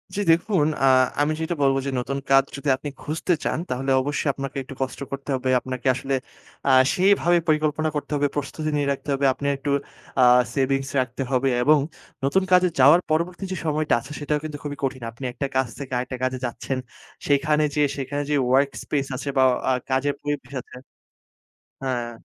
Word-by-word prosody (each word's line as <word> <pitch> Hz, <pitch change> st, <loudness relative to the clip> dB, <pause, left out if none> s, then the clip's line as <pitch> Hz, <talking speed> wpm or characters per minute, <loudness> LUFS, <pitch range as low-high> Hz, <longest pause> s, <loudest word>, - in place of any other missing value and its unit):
জি, -, -, -2 dB
দেখুন 170 Hz, -1 st, +2 dB, 0.2 s
আ -, -, +6 dB, 0.4 s
আমি 150 Hz, +1 st, +2 dB
যেটা 160 Hz, +2 st, -1 dB
বলব 135 Hz, -1 st, +4 dB
যে, -, -, -1 dB
নতুন 140 Hz, +3 st, -3 dB
কাজ 135 Hz, 0 st, +7 dB
যদি 140 Hz, 0 st, -3 dB
আপনি 145 Hz, +2 st, -6 dB
খুঁজতে 160 Hz, +4 st, -1 dB
চান, -, -, -1 dB
তাহলে 135 Hz, +2 st, -1 dB
অবশ্যই 145 Hz, +1 st, -1 dB
আপনাকে 135 Hz, +1 st, -6 dB
একটু 135 Hz, -, -10 dB
কষ্ট 130 Hz, -2 st, -3 dB
করতে 140 Hz, +1 st, -6 dB
হবে। 130 Hz, 0 st, -2 dB
আপনাকে 130 Hz, 0 st, -5 dB
আসলে 135 Hz, +1 st, -3 dB, 0.5 s
আ -, -, +4 dB, 0.2 s
সেইভাবে 180 Hz, -2 st, +4 dB
পরিকল্পনা 155 Hz, 0 st, +1 dB
করতে 145 Hz, -, -4 dB
হবে, 145 Hz, 0 st, +2 dB
প্রস্তুতি 150 Hz, +2 st, -3 dB
নিয়ে 145 Hz, -1 st, 0 dB
রাখতে 140 Hz, +1 st, -5 dB
হবে। 140 Hz, 0 st, 0 dB
আপনি 140 Hz, -, -4 dB
একটু 140 Hz, +1 st, -4 dB, 0.5 s
আ 125 Hz, -, +6 dB, 0.3 s
সেভিংস 135 Hz, 0 st, 0 dB
রাখতে 125 Hz, +1 st, -5 dB
হবে। 135 Hz, +1 st, +2 dB
এবং 150 Hz, +1 st, +5 dB, 0.4 s
নতুন 185 Hz, +8 st, +2 dB
কাজে 180 Hz, 0 st, +6 dB
যাওয়ার 150 Hz, +7 st, +7 dB
পরবর্তী 170 Hz, +4 st, -1 dB
যে -, -, -1 dB
সময়টা 155 Hz, 0 st, +1 dB
আছে, 135 Hz, +5 st, -12 dB
সেটাও 150 Hz, 0 st, -1 dB
কিন্তু 150 Hz, -2 st, -5 dB
খুবই 145 Hz, -1 st, -5 dB
কঠিন। 130 Hz, -2 st, -2 dB
আপনি 115 Hz, +4 st, -12 dB
একটা 140 Hz, -, -3 dB
কাজ 130 Hz, -1 st, +2 dB
থেকে 135 Hz, -2 st, -7 dB
আরেকটা 125 Hz, +1 st, -4 dB
কাজে 130 Hz, 0 st, 0 dB
যাচ্ছেন। 130 Hz, +2 st, -3 dB, 0.5 s
সেখানে 150 Hz, +2 st, +3 dB, 0.7 s
যে, 150 Hz, -, +2 dB
ওয়ার্ক 135 Hz, +2 st, +3 dB
স্পেস 140 Hz, -2 st, -1 dB
আছে 140 Hz, -, -4 dB
বা 130 Hz, -, +6 dB, 0.3 s
আ -, -, +4 dB, 0.2 s
কাজের 135 Hz, +2 st, +1 dB
পরিবেশ 145 Hz, -3 st, -4 dB
আছে -, -, -15 dB, 1.1 s
হ্যাঁ। 120 Hz, -3 st, -2 dB
140 Hz, 180 wpm, -23 LUFS, 130-150 Hz, 1.1 s, কাজ